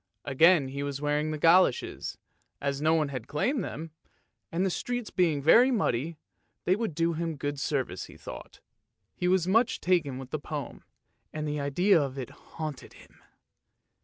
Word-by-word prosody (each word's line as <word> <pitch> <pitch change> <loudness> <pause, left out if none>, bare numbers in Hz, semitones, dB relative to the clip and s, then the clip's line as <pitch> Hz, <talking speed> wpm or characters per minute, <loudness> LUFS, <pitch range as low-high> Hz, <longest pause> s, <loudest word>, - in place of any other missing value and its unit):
Again 145 +1 +4
he 140 +1 -5
was 140 -1 -3
wearing 150 +1 0
the 155 - -2
goloshes, 165 -3 +3 0.4
as 140 0 -2
no 160 +1 +3
one 155 -3 +1
had 130 -5 -6
claimed 235 - 0
them, 160 0 -6 0.6
and 175 +3 0
the 190 - +1
streets 245 +4 -3
being 160 -6 +1
very 235 - +7
muddy, 165 - 0 0.5
they 185 - +4
would 215 -7 -3
do 165 +1 +1
him 165 0 -3
good 145 0 -3
service, 130 - -2
he - - -14
thought. - - -10 0.5
He 180 - -1
was 180 -1 +2
much 225 +5 +3
taken 165 -8 +1
with 130 -1 -9
the 155 - -2
poem, 145 -3 -6 0.5
and 155 0 -4
the 150 0 -2
idea 165 +6 +3
of 135 -1 -3
it 130 -3 -5
haunted 155 -4 -8
him. - - -18
155 Hz, 170 wpm, -28 LUFS, 140-180 Hz, 0.6 s, very